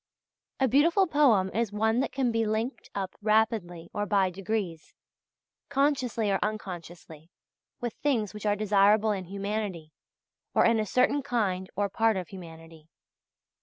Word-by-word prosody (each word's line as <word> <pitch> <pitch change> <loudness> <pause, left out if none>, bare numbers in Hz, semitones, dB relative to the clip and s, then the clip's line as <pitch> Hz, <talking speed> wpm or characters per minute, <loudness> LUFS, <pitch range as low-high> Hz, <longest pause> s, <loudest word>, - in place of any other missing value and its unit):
A 265 - +3
beautiful 330 - +4
poem 255 - +3
is 225 -1 0
one 220 +3 +1
that 270 - -1
can 260 -3 0
be 225 0 +1
linked 220 +4 -3
up 190 -2 -3
rapidly 210 -6 +1
or 205 0 -2
by 195 -3 +2
degrees, 185 -3 -4 0.7
consciously 265 -6 +1
or 195 - +1
unconsciously, 175 -6 -6 0.5
with 240 -2 -3
things 230 -9 0
which 210 0 -5
are 205 - +3
desirable 210 +1 +3
in 190 -3 -3
humanity, 195 -4 -4 0.6
or - - +5
in 230 -1 +3
a 215 - -1
certain 255 +6 +2
kind 200 -8 -1
or 205 +1 +1
part 225 +1 +1
of 180 -3 -5
humanity. 165 -3 -12
210 Hz, 145 wpm, -28 LUFS, 185-230 Hz, 0.7 s, or